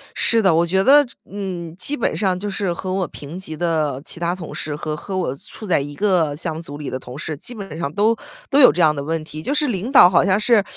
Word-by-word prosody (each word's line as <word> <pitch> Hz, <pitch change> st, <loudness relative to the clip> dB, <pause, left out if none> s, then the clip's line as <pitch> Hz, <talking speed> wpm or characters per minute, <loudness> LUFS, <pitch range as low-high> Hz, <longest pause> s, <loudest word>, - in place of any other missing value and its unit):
是 230 Hz, -1 st, +3 dB
的， 190 Hz, -5 st, +4 dB
我 170 Hz, +1 st, +3 dB
觉 190 Hz, +3 st, +1 dB
得， 285 Hz, +1 st, +6 dB, 0.2 s
嗯， 180 Hz, -5 st, -5 dB
基 285 Hz, +10 st, -2 dB
本 235 Hz, -, -1 dB
上 190 Hz, -3 st, 0 dB
就 205 Hz, +2 st, -4 dB
是 195 Hz, -2 st, -1 dB
和 185 Hz, +2 st, -4 dB
我 185 Hz, -3 st, -1 dB
平 150 Hz, +5 st, -9 dB
级 160 Hz, -5 st, -5 dB
的 155 Hz, -5 st, -1 dB
其 170 Hz, -, -4 dB
他 175 Hz, +1 st, 0 dB
同 170 Hz, -4 st, -8 dB
事 150 Hz, -1 st, -4 dB
和 150 Hz, 0 st, -4 dB
和 190 Hz, +5 st, -6 dB
我 170 Hz, -8 st, -1 dB
处 215 Hz, +9 st, -11 dB
在 180 Hz, -, +2 dB
一 145 Hz, +1 st, -6 dB
个 175 Hz, -5 st, +1 dB
项 160 Hz, +1 st, -2 dB
目 -, -, -5 dB
组 145 Hz, -4 st, -8 dB
里 145 Hz, -1 st, -6 dB
的 130 Hz, -, -3 dB
同 125 Hz, +1 st, -10 dB
事， 155 Hz, -1 st, -4 dB
基 240 Hz, -, -8 dB
本 195 Hz, -6 st, -8 dB
上 140 Hz, -4 st, -3 dB
都 215 Hz, +3 st, +3 dB, 0.4 s
都 280 Hz, -, +4 dB
有 255 Hz, -, +9 dB
这 -, -, -2 dB
样 155 Hz, -2 st, +5 dB
的 140 Hz, -, -4 dB
问 160 Hz, +2 st, -2 dB
题， 155 Hz, 0 st, -8 dB
就 275 Hz, -, -1 dB
是 300 Hz, 0 st, +2 dB
领 215 Hz, +3 st, -2 dB
导 180 Hz, -10 st, +8 dB
好 175 Hz, -1 st, +4 dB
像 190 Hz, +1 st, +3 dB
是 215 Hz, -1 st, +4 dB
175 Hz, 290 characters per minute, -20 LUFS, 155-200 Hz, 0.4 s, 有